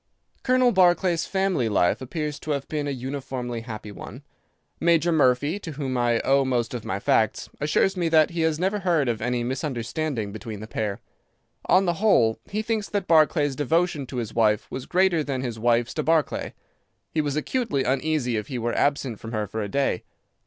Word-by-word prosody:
"Colonel 255 -1 +3
Barclay's 175 -3 +3
family 190 - 0
life 95 0 +2
appears 150 +2 -4
to 155 - -5
have 140 -1 -4
been 150 -2 -2
a - - -1
uniformly 130 -2 -4
happy 110 -2 -7
one. - - -10 0.6
Major 170 0 +3
Murphy, 145 +3 +2
to 165 -6 -7
whom 135 -3 -3
I 120 -1 +2
owe 135 0 +3
most 125 -3 -1
of 120 -3 -4
my 95 - -3
facts, 110 +2 +1
assures 155 +6 +2
me 175 -3 0
that 160 -1 +4
he 170 -1 -2
has 160 -1 +1
never 190 +5 0
heard 170 -7 +1
of 115 -2 -1
any 125 -1 -1
misunderstanding 130 -2 -3
between 110 0 -7
the 110 - -7
pair. 105 -2 -3 0.7
On 190 +1 +4
the 175 - +2
whole, 115 - +4
he 215 +2 -2
thinks 220 -2 -2
that 205 -3 -1
Barclay's 155 -3 +3
devotion 155 0 0
to 130 - -6
his 115 -3 -3
wife 105 -2 +2
was 130 - -6
greater 180 -3 +2
than 135 -3 -3
his 120 -3 -4
wife's 120 +1 +2
to 155 - -1
Barclay. 160 0 0 0.6
He 155 - +1
was 145 -2 -2
acutely 155 - -1
uneasy 130 -2 0
if 105 - -4
he 130 - -4
were 120 0 -1
absent 135 -6 0
from 115 +1 -8
her 105 -1 -1
for 110 +2 -4
a 100 - -3
day. 135 -7 0
140 Hz, 195 wpm, -25 LUFS, 120-165 Hz, 0.7 s, that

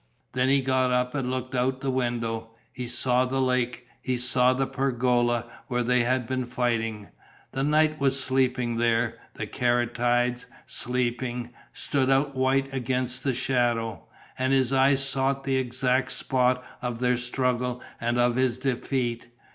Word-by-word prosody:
Then 125 +1 +1
he 140 0 +4
got 130 -1 +2
up 125 0 +1
and 135 -3 -2
looked 130 0 -3
out 130 +1 +1
of - - -19
the 135 - -1
window. 115 -3 -2 0.2
He 125 -1 -5
saw 125 +1 +2
the 135 +1 -1
lake. 125 -1 0 0.2
He 130 -1 -1
saw 125 +1 +3
the 135 +1 0
pergola, 120 -3 +1 0.2
where 125 -1 0
they 125 +1 +2
had 125 +1 +1
been 130 +1 -2
fighting. 115 -4 -1 0.4
The 135 - -2
night 155 +1 +3
was 135 -1 +2
sleeping 130 -2 +1
there; 115 0 +1 0.2
the - - -4
caryatides, 120 0 0 0.2
sleeping, 125 0 -2 0.2
stood 135 -2 -1
out 135 +1 +2
white 135 +1 +1
against 125 0 -1
the 135 -3 0
shadow. 120 -3 0 0.4
And 130 +1 +1
his 130 -1 +2
eyes 135 0 +4
sought 135 0 0
the 135 -1 +1
exact 125 0 0
spot 125 -1 +1 0.2
of 120 -2 -3
their 125 0 +1
struggle 125 0 -1 0.2
and 120 +1 0
of 120 0 +2
his 130 -2 +2
defeat. 125 -2 -2
125 Hz, 155 wpm, -26 LUFS, 120-130 Hz, 0.4 s, he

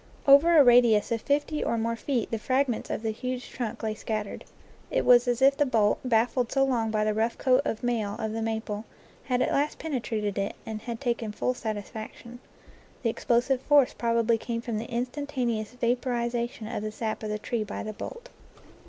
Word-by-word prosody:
Over 305 +5 +7
a 295 - +9
radius 240 -4 +5
of 230 -1 0
fifty 295 +1 0
or 235 - 0
more 230 +1 -1
feet 245 0 -2
the 225 - -1
fragments 255 0 0
of - - -3
the 220 - 0
huge 250 +3 -5
trunk 235 -4 -5
lay 220 -1 -1
scattered. 215 -1 -4 0.4
It - - 0
was 245 0 +6
as 245 +1 +1
if 275 +1 +6
the 290 - +2
bolt, 215 -4 +2
baffled 245 0 +1
so 270 - +3
long 235 -4 0
by 215 -1 +1
the 215 0 +1
rough 225 +2 0
coat 260 0 +3
of 225 - -3
mail 225 -4 -1
of 220 -1 -3
the 225 +1 -3
maple, 220 -1 -3 0.4
had 250 -1 +1
at - - -1
last 290 +2 0
penetrated 225 -9 -2
it 195 - -2
and 220 -1 -5
had 230 0 -5
taken 235 -4 -2
full 250 +4 -1
satisfaction. 220 +1 -7 0.6
The 230 - +2
explosive 250 +3 +1
force 285 -2 +4
prob 230 -1 0
ably 230 0 +3
came 230 0 -3
from 230 -2 -3
the 225 - -7
instantaneous 245 -3 -2
vaporization 240 -1 -1
of 230 -2 -4
the 215 0 -4
sap 215 0 -3
of 215 - -4
the 210 - -1
tree 220 +1 -2
by 210 - -6
the 215 - -5
bolt. 485 - -8
235 Hz, 200 wpm, -27 LUFS, 220-255 Hz, 0.6 s, a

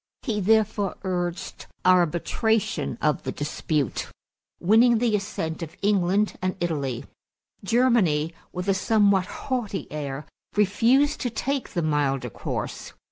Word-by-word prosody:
He 220 -6 -1
therefore 210 -1 +2
urged 175 -2 -3 0.2
arbitration 185 +5 +2
of 150 -2 +2
the 130 - -4
dispute, 145 - -2 0.5
winning 225 +5 +5
the 225 -2 +2
assent 185 -6 -3
of 165 +1 -7
England 200 0 +2
and 185 0 -1
Italy. 140 -8 -2 0.6
Germany, 195 -9 +2 0.2
with 180 +1 -5
a 195 - +4
somewhat 200 -1 +3
haughty 240 -7 -3
air, 145 -1 -4 0.3
refused 235 +9 +3
to 245 - 0
take 270 +4 -3
the 170 - 0
milder 135 -5 0
course. - - -5
190 Hz, 120 wpm, -25 LUFS, 160-220 Hz, 0.6 s, winning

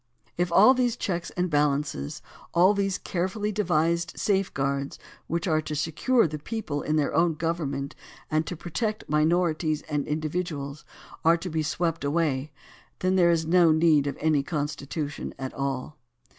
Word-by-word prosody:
If 175 0 0
all 210 +9 +7
these 245 -2 +1
checks 175 -6 -2
and 180 0 +1
balances, 145 - 0 0.3
all 185 +4 +6
these 195 -1 0
carefully 190 +4 -2
devised 170 -4 +1
safe 195 -2 +1
guards 140 0 -2 0.3
which 170 +3 -2
are 155 -2 +2
to 155 0 -5
secure 165 - +2
the 155 0 -5
people 155 -5 -4
in 155 - -1
their 150 -2 +1
own 165 -1 +3
government 150 -4 -2 0.4
and 155 0 +2
to 180 - -3
protect 215 +7 -3
minorities 155 0 +1
and 145 -2 -2
individuals, 155 -2 -3 0.4
are 165 +1 +5
to 180 +1 -6
be 160 0 0
swept 165 +1 -1
away, 145 -2 0 0.5
then 185 +1 +2
there 175 -2 +5
is 165 -1 +2
no 170 0 +5
need 155 -3 +4
of 140 - -3
any 155 -2 +2
Constitution 145 0 -4
at 130 -1 -5
all. 140 +2 -4
160 Hz, 155 wpm, -26 LUFS, 150-180 Hz, 0.5 s, all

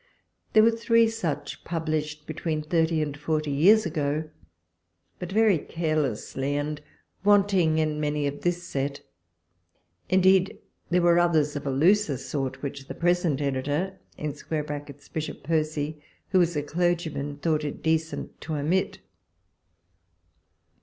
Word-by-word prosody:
There 215 - +7
were 230 - +6
three 230 0 +3
such 165 -10 -4
published 155 -2 -3
between 155 -2 -3
thirty 160 0 +1
and 145 -1 -4
forty 155 0 -1
years 195 +10 +5
ago, 155 -1 -2 0.9
but 180 0 -6
very 210 -4 +4
carelessly, 145 -4 -2
and 150 +1 -2 0.4
wanting 195 -5 +4
many 150 -1 0
in 140 0 -3
this 175 0 -1
set: 140 -1 -3 1.1
in 190 0 +4
deed, 190 0 +4 0.3
there 175 0 +2
were 175 0 +5
others, 155 -4 +2
of 145 0 -4
a - - +1
looser 160 +2 +3
sort, 135 +1 -4
which 140 -1 -5
the - - -6
present 175 -4 +1
editor 145 +7 -1 0.2
[Bishop 150 0 -5
Percy], 155 -1 -1 0.3
who 185 -1 +4
is 170 -1 +1
a 145 - 0
clergyman, 160 -3 -1
thought 155 0 0
it 145 - -5
decent 160 0 -1
to 155 - -4
omit. 160 +6 0
155 Hz, 125 wpm, -26 LUFS, 145-175 Hz, 1.1 s, There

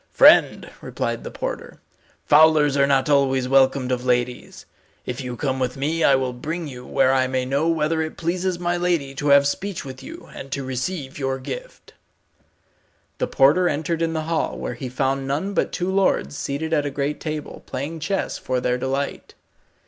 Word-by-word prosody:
"Friend," - - +6
replied - - -3
the - - -5
porter, - - -6 0.5
"fowlers 150 -1 +5
are 140 -1 +3
not 135 0 +2
always 135 -3 +2
welcomed 135 -1 +3
of 125 -1 -1
ladies. 125 -1 -2 0.4
If 125 +1 -4
you 125 -1 -5
come 130 -1 -1
with 125 0 -2
me 160 +4 -1
I 140 - +6
will 130 -1 -1
bring 160 +6 -4
you 125 -3 -9
where 130 - +3
I 130 -1 +2
may 130 0 -1
know 140 +5 0
whether 160 0 +1
it 155 0 -4
pleases 180 +2 -1
my 175 0 -1
lady 170 -6 0
to 145 +2 -3
have 140 0 +6
speech 185 +4 -3
with 130 -1 -8
you - - -10
and 135 - -9
to 140 - -3
receive 130 +2 -4
your 135 -1 -1
gift." - - -8 1.3
The - - 0
porter 155 +7 +4
entered 160 +3 -2
in 165 -1 0
the 160 - -1
hall, 165 +1 -1
where - - -4
he 130 -4 -6
found 135 +1 -1
none 155 +9 -2
but - - 0
two 180 +1 -2
lords 195 -6 +1
seated 150 +4 -3
at 150 -2 +2
a - - -1
great 140 +1 -2
table, 155 -2 -5
playing 145 +5 -4
chess 195 +5 -2
for 130 -1 -1
their 125 0 0
delight. 135 +2 -3
140 Hz, 185 wpm, -22 LUFS, 130-160 Hz, 1.3 s, Friend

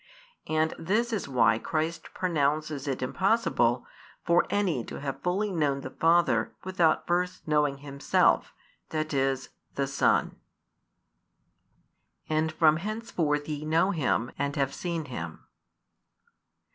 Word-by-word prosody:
And 155 0 +1
this 215 +8 0
is 205 - -2
why 125 -4 +3
Christ 160 +3 -3
pronounces 150 -4 0
it 130 -2 -2
impossible 130 - +1 0.4
for 170 0 +3
any 180 - 0
to - - -7
have 140 -1 -5
fully 195 +4 0
known 145 -6 0
the 130 - -7
Father 170 +3 +2
without 180 -4 +2
first 180 0 -1
knowing 150 -2 +2
Himself, 140 0 +1 0.4
that 155 -1 -2
is, 135 -1 0 0.3
the 140 - 0
Son. 140 +1 +1 1.9
And 155 0 +1
from 155 -1 +4
henceforth 170 -7 -2
ye 150 -1 -4
know 165 +5 +2
Him, 130 - 0
and 140 0 -1
have 140 -2 0
seen 170 -3 -3
Him. 85 - -7
155 Hz, 120 wpm, -28 LUFS, 140-175 Hz, 1.9 s, from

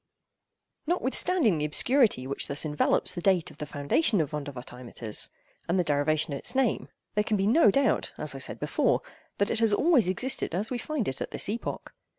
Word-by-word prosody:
Notwithstanding 310 - +1
the 150 - 0
obscurity 220 - +2
which 140 +1 -3
thus 140 +2 +1
envelops 150 -1 +1
the 175 - -5
date 185 -3 +2
of - - -18
the 150 - -5
foundation 185 - +1
of 155 -4 -1
Vondervotteimittis, 125 -6 -4 0.4
and 175 - +2
the 180 - +3
derivation 150 0 +1
of 140 - -3
its 245 - -9
name, 265 -4 +1 0.2
there 210 - +1
can 215 0 0
be 195 - 0
no 225 +2 +5
doubt, 275 +6 +1
as - - -4
I - - -7
said - - -5
before, - - +1 0.3
that 200 - +1
it - - 0
has 225 -2 +3
always 290 - +3
existed 220 -1 -1
as 210 +6 -2
we 245 - -2
find 300 -7 -3
it 135 - -3
at - - -3
this - - -1
epoch. 220 +4 -5
190 Hz, 195 wpm, -27 LUFS, 150-245 Hz, 0.4 s, no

